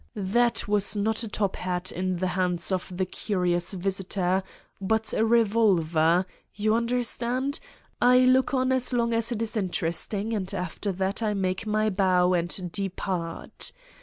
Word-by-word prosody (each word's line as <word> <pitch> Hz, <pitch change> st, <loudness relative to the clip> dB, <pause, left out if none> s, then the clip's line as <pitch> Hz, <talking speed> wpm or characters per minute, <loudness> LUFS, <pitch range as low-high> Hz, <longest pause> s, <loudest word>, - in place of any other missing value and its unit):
That 230 Hz, +5 st, +1 dB
was 205 Hz, 0 st, +2 dB
not 220 Hz, +2 st, 0 dB
a 230 Hz, -, -1 dB
top 205 Hz, -2 st, -2 dB
hat 180 Hz, 0 st, -2 dB
in 185 Hz, +1 st, -2 dB
the 185 Hz, +1 st, -1 dB
hands 180 Hz, -1 st, -1 dB
of 185 Hz, 0 st, -2 dB
the 185 Hz, -, +1 dB
curious 180 Hz, -2 st, -1 dB
visitor, 190 Hz, 0 st, -1 dB, 0.4 s
but 220 Hz, +3 st, 0 dB
a 220 Hz, -, +2 dB
revolver... 190 Hz, -7 st, +3 dB, 0.3 s
you 215 Hz, +1 st, +1 dB
understand: 245 Hz, +3 st, -1 dB, 0.4 s
I 250 Hz, +1 st, +6 dB
look 255 Hz, +1 st, +4 dB
on 260 Hz, -1 st, +1 dB
as 260 Hz, -1 st, +2 dB
long 235 Hz, -1 st, +1 dB
as 230 Hz, +1 st, +2 dB
it 230 Hz, -1 st, -1 dB
is 220 Hz, 0 st, -2 dB
interest 175 Hz, -5 st, -1 dB
ing 210 Hz, +3 st, -2 dB
and 190 Hz, -4 st, -2 dB
after 180 Hz, +3 st, -3 dB
that 190 Hz, +4 st, -1 dB
I 215 Hz, -2 st, 0 dB
make 190 Hz, +2 st, -2 dB
my 215 Hz, 0 st, +1 dB
bow 185 Hz, -2 st, +3 dB
and 175 Hz, +1 st, -2 dB
depart. 185 Hz, -3 st, -4 dB
200 Hz, 160 wpm, -26 LUFS, 185-225 Hz, 0.4 s, I